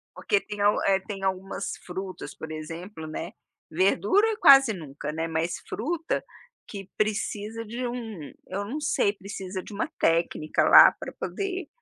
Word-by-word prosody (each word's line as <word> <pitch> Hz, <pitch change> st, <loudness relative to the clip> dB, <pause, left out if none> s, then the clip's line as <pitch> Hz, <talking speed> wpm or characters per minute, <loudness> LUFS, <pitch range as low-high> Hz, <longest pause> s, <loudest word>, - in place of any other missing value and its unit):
Porque 410 Hz, -, +1 dB
tem 210 Hz, -, -8 dB, 0.3 s
eh, 195 Hz, -1 st, +4 dB
tem 195 Hz, -1 st, -7 dB
algumas 190 Hz, +1 st, -2 dB
frutas, 185 Hz, +1 st, -6 dB
por 160 Hz, -, -8 dB
exemplo, 160 Hz, +2 st, -7 dB
né, 155 Hz, -, -5 dB, 0.4 s
verdura 195 Hz, -, +3 dB
é 430 Hz, -, -4 dB
quase 275 Hz, -, +7 dB
nunca, 150 Hz, -4 st, -6 dB
né, 160 Hz, +1 st, -2 dB
mas 165 Hz, +1 st, -2 dB
fruta 330 Hz, +1 st, -2 dB, 0.4 s
que 195 Hz, -2 st, -8 dB
precisa 215 Hz, +1 st, -2 dB
de 235 Hz, +4 st, -4 dB
um 225 Hz, -, -6 dB, 0.2 s
eu 195 Hz, +2 st, -3 dB
não 265 Hz, +9 st, -4 dB
sei 200 Hz, -, +2 dB
precisa 195 Hz, -2 st, -6 dB
de -, -, -11 dB
uma 200 Hz, -, -2 dB
técnica 165 Hz, -2 st, +1 dB
lá -, -, +10 dB
pra -, -, -6 dB
poder, 380 Hz, -2 st, -3 dB
195 Hz, 150 wpm, -26 LUFS, 170-230 Hz, 0.4 s, lá